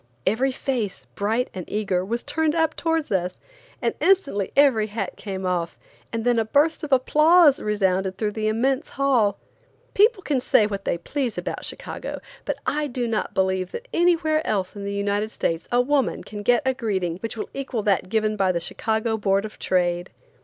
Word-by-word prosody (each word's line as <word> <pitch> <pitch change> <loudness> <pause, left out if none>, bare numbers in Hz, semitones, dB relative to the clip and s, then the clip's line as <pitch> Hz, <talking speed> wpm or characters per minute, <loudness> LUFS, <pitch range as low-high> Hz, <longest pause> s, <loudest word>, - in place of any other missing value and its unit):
Every 250 +7 +2
face, 245 -7 -3
bright 225 +5 -1
and 185 - -5
eager, 195 -4 0
was 235 +5 -3
turned 320 0 0
up 320 -1 +1
towards 325 -4 -1
us, 180 -1 -1 0.6
instantly 280 - +2
every 260 -7 +4
hat 220 +2 -4
came 190 -2 -5
off, 175 -2 -1 0.3
and 230 0 -3
then 240 -1 +3
a - - +2
burst 295 +9 +2
of 295 - -5
applause 305 +3 +5
resounded 190 -3 0
through 215 -2 -1
the 215 0 -2
immense 260 +7 0
hall. 250 -7 +2 0.6
People 420 -1 +4
can 280 -4 +1
say 215 - +4
what 200 -1 -4
they - - 0
please 250 - -3
about - - -4
Chicago, - - -6 0.3
but - - -2
I 300 +1 0
do 245 -2 -2
not 225 -2 -2
believe 190 -1 0
that 480 - -6
anywhere 330 -3 +3
else 190 -2 -1
in 200 -1 -6
the 200 - -3
United 200 +1 -1
States 165 -6 -2
a 245 - +3
woman 275 +1 0
can 210 -1 -7
get 240 +6 +3
a 260 - +2
greeting 190 -9 -2
which 225 +4 -6
will - - -5
equal 260 -5 -3
that 195 -3 +1
given 215 0 +1
by 190 -2 +2
the 170 - -1
Chicago 220 +5 -1
Board 195 -1 +1
of 215 - -10
Trade. 175 -1 0
220 Hz, 185 wpm, -24 LUFS, 195-275 Hz, 0.6 s, applause